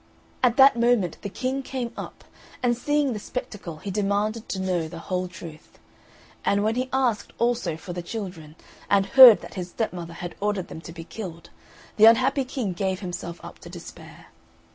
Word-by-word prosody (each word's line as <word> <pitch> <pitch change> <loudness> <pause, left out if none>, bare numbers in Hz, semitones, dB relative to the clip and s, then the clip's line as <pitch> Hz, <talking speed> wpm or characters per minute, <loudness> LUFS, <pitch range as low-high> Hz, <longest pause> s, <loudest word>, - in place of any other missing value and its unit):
At 245 -2 +3
that 270 -3 +7
moment 235 -8 +2
the 200 - -5
King 260 +6 -2
came 255 -3 -4
up, - - -8 0.4
and 240 -1 +3
seeing 290 +2 +1
the 210 - -4
spectacle 200 -8 -6
he 195 +5 -6
demanded 210 +3 -1
to - - -2
know 180 -3 -1
the 165 +1 -9
whole 180 +2 -3
truth; 170 -3 -12 0.7
and 200 0 +2
when 220 +1 +2
he 255 +2 -2
asked 255 -5 0
also 235 -9 0
for 175 +2 -8
the 175 - -4
children, 175 -6 -7 0.3
and 200 -1 +4
heard 245 +2 +9
that - - -10
his 180 -2 -5
stepmother 175 -6 -4
had 175 0 -6
ordered 205 -3 -1
them 160 - -8
to 165 - -10
be 165 0 -8
killed, 170 -2 -8 0.5
the 215 - +8
unhappy 255 +4 +5
King 245 -7 -3
gave 190 +2 -2
himself 175 -2 -6
up - - -11
to - - -11
despair. - - -12
205 Hz, 185 wpm, -25 LUFS, 175-240 Hz, 0.7 s, heard